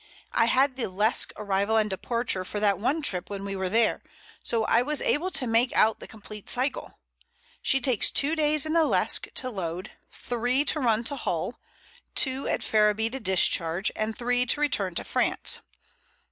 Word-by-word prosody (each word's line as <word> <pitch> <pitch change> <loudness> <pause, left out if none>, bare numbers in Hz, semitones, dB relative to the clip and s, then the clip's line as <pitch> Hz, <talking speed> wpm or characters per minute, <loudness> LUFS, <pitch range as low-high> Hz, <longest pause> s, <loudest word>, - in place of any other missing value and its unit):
I 230 - +3
had 260 +2 +2
the 245 - -2
Lesque 210 +4 +2
arrival 205 +1 0
and 215 -1 +2
departure 215 0 -2
for 205 +3 -4
that 200 -3 +2
one 280 +9 -1
trip 180 -10 0
when 200 -1 -6
we 195 0 -4
were 190 -1 -2
there, 225 +3 +2 0.4
so 230 -1 -1
I 230 +2 +2
was 295 +3 -1
able 345 +6 0
to 270 - 0
make 230 +2 +2
out 220 0 +3
the - - -10
complete 215 -1 -11
cycle. 260 +3 -1 0.6
She 270 - +2
takes 255 -5 +1
two 295 +3 +2
days 305 -1 +3
in 310 - -2
the 335 -1 +4
Lesque - - +2
to 255 -1 -2
load, 180 -1 -5 0.2
three 245 +4 -1
to 305 - 0
run 230 -4 +1
to 285 - -1
Hull, - - -3 0.6
two 265 0 +1
at - - -1
Ferriby 215 +1 +2
to 265 - -5
discharge, 185 -3 +1
and 215 0 -3
three 245 +1 0
to 290 - +1
return 200 -12 0
to - - -1
France. - - 0
225 Hz, 185 wpm, -26 LUFS, 205-265 Hz, 0.6 s, the